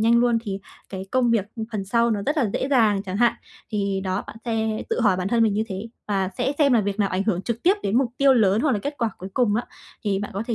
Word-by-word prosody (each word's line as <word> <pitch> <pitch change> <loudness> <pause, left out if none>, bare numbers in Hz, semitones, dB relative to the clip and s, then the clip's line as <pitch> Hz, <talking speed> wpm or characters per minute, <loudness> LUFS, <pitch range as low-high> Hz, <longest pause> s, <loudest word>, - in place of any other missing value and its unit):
nhanh 230 +2 +4
luôn 240 -1 +3
thì 195 -3 -4 0.3
cái 190 0 -6
công 250 -2 +3
việc 220 -4 +2 0.3
phần 200 -2 -2
sau 235 +3 +2
nó 205 -2 -1
rất 295 +3 +1
là 240 -9 +1
dễ 265 - -1
dàng 215 -7 +3
chẳng 190 -1 -4
hạn. 240 +1 +4 0.4
Thì 200 -2 -1
đó, 185 +1 -2
bạn - - -10
sẽ 220 -2 -1
tự - - 0
hỏi 205 -6 +3
bản 185 +1 -2
thân 230 0 +3
mình 215 -3 +3
như 215 - 0
thế 195 +4 -5 0.2
và 195 -2 0
sẽ 255 +3 +1
xem 280 -3 +4
là 230 - +5
việc 200 +1 -3
nào 200 - +2
ảnh 185 +1 -1
hưởng 190 -4 0
trực 235 -1 -3
tiếp 370 +4 +5
đến 215 +5 +2
mục 255 -3 +1
tiêu 275 -1 +5
lớn, 210 -2 +3
hoặc 295 -2 +2
là 210 - +1
kết 285 +7 -4
quả 230 -2 0
cuối 190 - -7
cùng 235 -5 +2
á, 240 - 0 0.4
thì 195 -2 +1
bạn 205 - -5
có 200 - -2
thể 235 - -1
220 Hz, 290 wpm, -23 LUFS, 195-240 Hz, 0.4 s, là